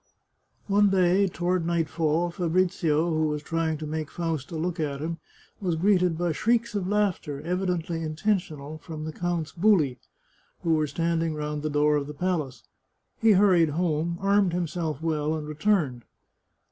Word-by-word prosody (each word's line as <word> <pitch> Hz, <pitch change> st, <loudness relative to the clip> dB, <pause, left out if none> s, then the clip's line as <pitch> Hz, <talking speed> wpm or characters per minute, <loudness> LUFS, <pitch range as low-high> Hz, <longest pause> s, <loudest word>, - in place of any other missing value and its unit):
One 205 Hz, 0 st, +4 dB
day, 190 Hz, +1 st, +3 dB
toward 180 Hz, 0 st, -1 dB
nightfall, 165 Hz, 0 st, 0 dB
Fabrizio, 170 Hz, -2 st, +1 dB
who 155 Hz, 0 st, +1 dB
was 150 Hz, 0 st, -3 dB
trying 165 Hz, -1 st, -1 dB
to 155 Hz, -, -6 dB
make 155 Hz, -1 st, -4 dB
Fausta 165 Hz, -2 st, -3 dB
look 170 Hz, +2 st, -2 dB
at 145 Hz, -3 st, -2 dB
him, 165 Hz, +2 st, -4 dB, 0.4 s
was 180 Hz, -4 st, -1 dB
greeted 180 Hz, -1 st, +2 dB
by 175 Hz, 0 st, 0 dB
shrieks 230 Hz, +7 st, +1 dB
of 200 Hz, -3 st, -2 dB
laugh 205 Hz, -2 st, +1 dB
ter, 145 Hz, -2 st, -6 dB
evidently 175 Hz, -1 st, -2 dB
intentional, 155 Hz, -3 st, -2 dB
from 155 Hz, -1 st, -7 dB
the 155 Hz, -, -5 dB
count's 175 Hz, -3 st, -2 dB
huli, 165 Hz, -, +2 dB, 0.6 s
who 165 Hz, -, +2 dB
were 155 Hz, -1 st, +2 dB
standing 165 Hz, 0 st, -1 dB
round 150 Hz, 0 st, -3 dB
the 155 Hz, -, -2 dB
door 150 Hz, 0 st, +3 dB
of 140 Hz, -1 st, -3 dB
the 150 Hz, -, -7 dB
palace. 160 Hz, -6 st, -2 dB, 0.6 s
He 225 Hz, -1 st, +6 dB
hurried 185 Hz, -5 st, +5 dB
home, 170 Hz, -1 st, 0 dB
armed 195 Hz, -2 st, +2 dB
himself 165 Hz, -3 st, -2 dB
well, 155 Hz, -1 st, 0 dB
and 150 Hz, -1 st, -5 dB
returned. 150 Hz, -, 0 dB
165 Hz, 160 wpm, -26 LUFS, 155-180 Hz, 0.6 s, He